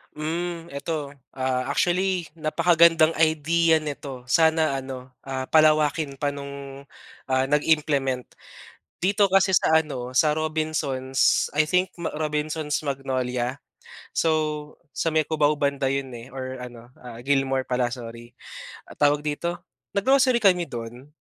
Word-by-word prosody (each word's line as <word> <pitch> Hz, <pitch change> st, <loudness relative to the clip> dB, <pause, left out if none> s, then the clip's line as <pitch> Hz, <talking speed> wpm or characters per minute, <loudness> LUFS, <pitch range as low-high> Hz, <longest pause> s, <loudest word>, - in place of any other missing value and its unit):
Mm, 165 Hz, +2 st, -4 dB
eto, 145 Hz, +1 st, -4 dB, 0.2 s
ah, 130 Hz, -1 st, -1 dB
actually 180 Hz, -1 st, 0 dB
napakagandang 165 Hz, +1 st, +4 dB
idea 160 Hz, +1 st, +3 dB
nito 140 Hz, -4 st, -6 dB
sana 160 Hz, -2 st, +3 dB
ano, 130 Hz, -1 st, -7 dB, 0.2 s
ah, 130 Hz, -1 st, -4 dB
palawakin 155 Hz, -1 st, +3 dB
pa 145 Hz, -, +1 dB
nung, 140 Hz, -1 st, -8 dB, 0.4 s
ah, 130 Hz, 0 st, 0 dB
nag-implement. 145 Hz, -4 st, +1 dB, 0.7 s
Dito 200 Hz, +2 st, +3 dB
kasi 195 Hz, 0 st, +3 dB
sa 160 Hz, -3 st, +4 dB
ano 130 Hz, -4 st, -7 dB
sa 150 Hz, +3 st, +3 dB
Robinson's 155 Hz, -4 st, 0 dB
I 155 Hz, -, +4 dB
think 180 Hz, +3 st, +1 dB
ma 170 Hz, -, -3 dB
Robinson's 150 Hz, 0 st, -2 dB
Magnolia 130 Hz, -3 st, -2 dB, 0.6 s
so 165 Hz, -, +1 dB, 0.6 s
sa -, -, -1 dB
may 155 Hz, 0 st, +2 dB
Cubao 150 Hz, -1 st, +2 dB
banda 140 Hz, -1 st, 0 dB
yun, 135 Hz, 0 st, -2 dB
eh, 120 Hz, +2 st, -11 dB
or 130 Hz, -1 st, -6 dB
ano, 120 Hz, -1 st, -11 dB, 0.2 s
ah, 120 Hz, -2 st, -9 dB
Gilmore 135 Hz, 0 st, 0 dB
pala 125 Hz, -1 st, 0 dB
sorry. 120 Hz, -1 st, -9 dB, 0.7 s
Tawag 145 Hz, 0 st, +3 dB
dito 160 Hz, +4 st, -2 dB, 0.4 s
nag-grocery 255 Hz, +2 st, +3 dB
kami 180 Hz, -4 st, +4 dB
dun 120 Hz, +3 st, -8 dB
150 Hz, 125 wpm, -24 LUFS, 130-160 Hz, 0.7 s, napakagandang